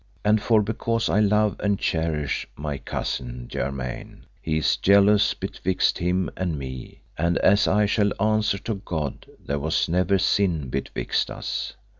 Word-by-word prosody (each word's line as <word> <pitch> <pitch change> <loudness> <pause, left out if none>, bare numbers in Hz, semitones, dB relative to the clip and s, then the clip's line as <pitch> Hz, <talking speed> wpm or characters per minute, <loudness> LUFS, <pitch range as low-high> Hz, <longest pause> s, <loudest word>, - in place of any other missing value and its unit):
And 105 0 +4
for 110 -1 +3
because 115 +2 -1
I 100 - +2
love 105 0 +2
and 100 -1 +1
cherish 80 -5 -1
my 75 -2 -4
cousin - - -4
germain, 65 -2 -5 0.2
he 80 -1 -1
is 80 - +2
jealous 100 +1 +4
betwixt 95 +1 -1
him 90 +1 0
and 90 -4 -2
me; 65 -2 -8 0.2
and 85 +2 +2
as 100 +2 +4
I 105 +2 +3
shall 105 0 +2
answer 110 -1 +2
to 100 -1 -5
God 75 -7 -4 0.2
there 70 +1 -1
was 80 +3 0
never 90 +3 +2
sin 90 -8 +1
betwixt 65 +2 -2
us. - - -4
90 Hz, 150 wpm, -24 LUFS, 75-105 Hz, 0.2 s, And